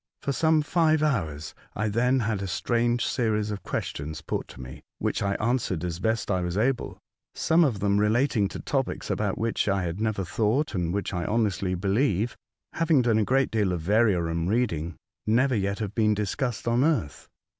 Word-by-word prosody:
For 140 - 0
some 160 +2 +3
five 155 -1 +2
hours 80 - -1 0.2
I 105 +2 0
then 125 +5 +2
had 105 -3 -1
a 100 - -3
strange 120 +5 0
series 110 -3 0
of 105 -2 -5
questions 75 +2 -4
put - - -3
to - - -13
me, 65 +1 -9 0.2
which - - -1
I 100 0 0
answered 110 -8 -1
as 85 -1 -3
best 110 +1 0
I 90 -1 +1
was 90 +1 -2
able 125 +4 0 0.2
— - - -63
some 165 +1 +3
of 115 -10 0
them 100 0 +2
relating 110 0 +2
to - - -7
topics 135 -2 -2
about 100 -3 -1
which 115 -2 0
I 100 -1 +1
had 85 +4 -3
never 110 -4 -1
thought, 115 - 0
and 85 -4 -1
which 100 +1 -2
I 85 -1 -2
honestly 100 -4 0
believe 100 +3 0 0.4
(having 160 -5 +3
done 115 -2 +3
a - - +3
good 135 +3 +2
deal 105 -4 +1
of 85 -3 -3
variorum 90 -5 +2
reading) 85 -8 0 0.3
never 125 +5 +3
yet 100 -2 0
have 105 -2 -4
been 110 -2 +2
discussed 110 +3 -2
on 120 +2 +3
earth. 120 - -1
105 Hz, 190 wpm, -26 LUFS, 95-120 Hz, 0.4 s, some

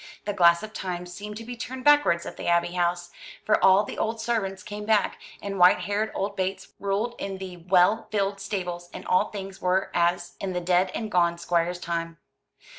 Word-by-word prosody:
The 205 - -1
glass 170 -2 +5
of 215 0 -8
Time 180 -3 -4
seemed 205 +4 -8
to 230 - -7
be 245 +2 -7
turned 255 +2 -6
backwards 290 -13 +4
at - - -7
the - - -6
Abbey 170 0 +2
House; 175 0 -1 0.3
for 215 - +2
all 190 +2 +6
the - - -7
old 225 +1 -1
servants 205 -5 -2
came 210 0 -7
back, 215 -1 +1 0.2
and 195 -1 -4
white 180 +1 +6
haired 210 +2 -1
old 200 +1 -2
Bates 190 0 -3
ruled 200 +4 -1
in 195 -1 -4
the 185 -2 -7
well 180 +5 +3
filled 200 -1 -1
stables, 180 -4 -4
and - - -8
all 185 - +2
things 195 -2 -8
were 185 +1 +1
as 175 0 +1
in 190 -1 -3
the 180 - -1
dead 180 +1 +2
and 220 -2 -4
gone 170 -2 +2
Squire's 170 +1 0
time. 165 -1 -3
190 Hz, 200 wpm, -26 LUFS, 175-210 Hz, 0.3 s, all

